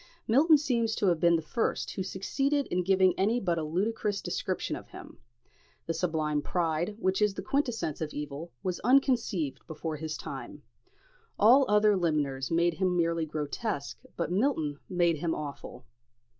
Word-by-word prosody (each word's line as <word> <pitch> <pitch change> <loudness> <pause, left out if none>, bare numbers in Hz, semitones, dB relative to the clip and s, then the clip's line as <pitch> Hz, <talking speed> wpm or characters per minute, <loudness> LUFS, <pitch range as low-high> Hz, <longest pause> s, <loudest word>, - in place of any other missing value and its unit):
Milton 300 +7 +6
seems 235 -6 0
to - - 0
have 170 -2 +1
been 170 +1 +4
the 160 - -1
first 225 +9 -1
who - - -4
succeeded 275 +10 -1
in 180 - +1
giving 185 0 +4
any 220 +6 +2
but 175 -6 0
a - - -2
ludicrous 200 +5 -1
description - - -3
of - - -9
him. - - -12 0.7
The 165 - -1
sublime 155 -3 0
pride, 170 +4 -1
which 190 -2 0
is 210 -2 +2
the - - -5
quintessence 245 - -1
of 155 -1 -3
evil, 150 +3 -6
was 185 -2 -2
unconceived 230 - +2
before 160 -1 -5
his 155 0 -4
time. - - -8 0.7
All 255 +6 +6
other 210 0 +4
limners 145 -7 0
made 170 +1 +2
him 180 +1 0
merely 165 -1 +1
grotesque, 150 +2 -4 0.2
but 170 0 -2
Milton 180 - 0
made 175 -3 +2
him 165 +2 -1
awful. 145 -2 -7
175 Hz, 160 wpm, -29 LUFS, 160-215 Hz, 0.7 s, Milton